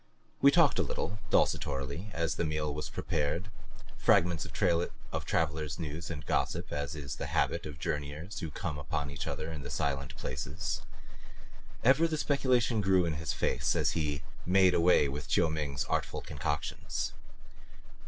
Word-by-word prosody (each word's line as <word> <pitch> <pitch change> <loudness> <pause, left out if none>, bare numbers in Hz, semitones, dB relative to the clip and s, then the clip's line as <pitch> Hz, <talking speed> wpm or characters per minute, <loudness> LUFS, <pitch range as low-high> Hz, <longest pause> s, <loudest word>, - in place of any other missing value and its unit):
We 140 - +9
talked 160 -1 +5
a - - +5
little, 105 +1 -2
desultorily, 70 +9 +1
as 85 -2 0
the - - -1
meal 75 -2 -1
was 75 +1 -4
prepared 80 +8 -1 0.5
fragments 85 -1 +3
of 85 - -9 0.7
traveler's 75 -1 0
news 80 0 -5
and 75 -5 -5
gossip, - - 0
as 75 0 -2
is 70 -3 -5
the - - -3
habit - - 0
of 75 -2 -8
journeyers 75 +9 -3
who 80 - -3
come 75 -1 -4
upon 70 0 -3
each 70 - -5
other 80 +1 -3
in 75 -3 -5
the 70 - -7
silent 70 -2 -2
places. 75 +9 -3 1.0
Ever 135 +7 +6
the 160 -1 -1
speculation 125 -6 +2
grew 95 -2 +4
in 85 - 0
his 75 -2 -2
face - - +1
as - - +2
he 75 -3 -1 0.2
made 95 0 +5
away 85 -4 +5
with 70 +1 -5
Chiu 80 -2 +3
Ming's 70 -4 -2
artful - - -1
concoctions. 75 0 -3
75 Hz, 155 wpm, -31 LUFS, 70-90 Hz, 1.0 s, We